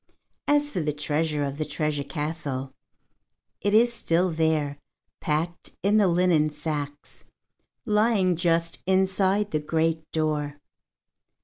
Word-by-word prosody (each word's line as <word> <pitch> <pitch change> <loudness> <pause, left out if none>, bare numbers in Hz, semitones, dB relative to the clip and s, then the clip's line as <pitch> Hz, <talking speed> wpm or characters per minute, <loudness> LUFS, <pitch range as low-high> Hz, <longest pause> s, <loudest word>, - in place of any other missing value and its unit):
As 290 0 +3
for 185 - -2
the 150 -2 -1
treasure 150 0 -1
of 140 +1 -4
the - - +1
treasure 150 -1 -2
castle, 140 -2 -4 0.9
it 205 - +1
is 235 +2 +5
still 180 -4 +1
there, 155 -3 0 0.4
packed 165 +3 -2
in 205 +2 +4
the 205 -2 +5
linen 170 -3 +3
sacks, 150 -1 -5 0.6
lying 210 -4 +3
just 165 0 0
inside 190 +2 +2
the 155 - +1
great 160 +1 -1
door. 150 -2 -1
160 Hz, 120 wpm, -26 LUFS, 150-185 Hz, 0.9 s, is